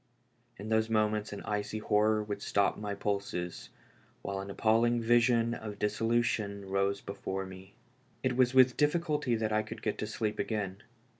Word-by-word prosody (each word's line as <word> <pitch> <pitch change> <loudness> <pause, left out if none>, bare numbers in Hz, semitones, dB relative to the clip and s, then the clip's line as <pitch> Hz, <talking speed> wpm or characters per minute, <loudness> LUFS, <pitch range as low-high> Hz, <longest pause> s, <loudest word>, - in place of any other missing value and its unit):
In 105 +2 -7
those 110 0 +2
moments 110 -1 +1
an 100 - -6
icy 105 0 -2
horror 105 0 +2
would 105 -1 -5
stop 100 -1 +1
my 105 -1 -4
pulses, 100 -4 -3 0.5
while 100 0 -3
an 100 +1 -6
appalling 115 +4 +2
vision 115 0 +3
of 105 -3 -6
dissolution 105 -1 0
rose 100 +1 0
before 95 -1 -4
me. 95 +1 -12 0.5
It 130 -1 +1
Avas 125 -1 +4
with 130 -1 +6
difficulty 150 -4 +1
that 110 -1 -1
I 110 - +3
could - - -9
get - - -2
to - - -2
sleep 105 -1 -2
again. 100 -3 -2
105 Hz, 160 wpm, -31 LUFS, 100-115 Hz, 0.5 s, with